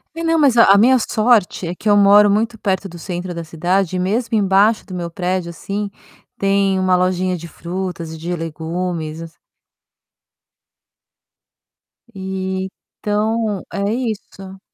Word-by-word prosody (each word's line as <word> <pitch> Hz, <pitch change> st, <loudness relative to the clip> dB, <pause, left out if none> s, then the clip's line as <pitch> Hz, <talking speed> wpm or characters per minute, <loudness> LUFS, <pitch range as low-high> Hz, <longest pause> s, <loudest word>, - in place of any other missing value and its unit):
E 330 Hz, -, -4 dB
não, 330 Hz, 0 st, +2 dB
mas, 285 Hz, -5 st, +4 dB
não, 230 Hz, -1 st, +6 dB
a 195 Hz, -, +7 dB
a -, -, +5 dB
minha 245 Hz, +6 st, +5 dB
sorte 215 Hz, -5 st, +1 dB
é 170 Hz, -, -3 dB
que 210 Hz, +4 st, -3 dB
eu 205 Hz, -, +5 dB
moro 205 Hz, +1 st, +6 dB
muito 225 Hz, +3 st, +1 dB
perto 195 Hz, -1 st, -1 dB
do 175 Hz, -2 st, -11 dB
centro 180 Hz, +1 st, -5 dB
da 170 Hz, 0 st, -5 dB
cidade 175 Hz, +3 st, -1 dB
e -, -, -1 dB
mesmo 220 Hz, +5 st, 0 dB
embaixo 200 Hz, +2 st, +3 dB
do 190 Hz, -, -10 dB
meu 175 Hz, -1 st, -4 dB
prédio, 180 Hz, 0 st, -2 dB
assim, 200 Hz, +5 st, -4 dB, 0.5 s
tem 195 Hz, -1 st, +2 dB
uma 185 Hz, -1 st, +3 dB
lojinha 185 Hz, 0 st, +1 dB
de 170 Hz, -1 st, -8 dB
frutas 170 Hz, -1 st, -5 dB
e -, -, -8 dB
de 170 Hz, +3 st, -3 dB
legumes, 165 Hz, 0 st, -4 dB
essas 165 Hz, -1 st, -10 dB, 2.8 s
Então, 190 Hz, +3 st, -3 dB
é 200 Hz, -, -2 dB, 0.3 s
isso. 195 Hz, -2 st, -10 dB
190 Hz, 150 wpm, -19 LUFS, 175-205 Hz, 2.8 s, a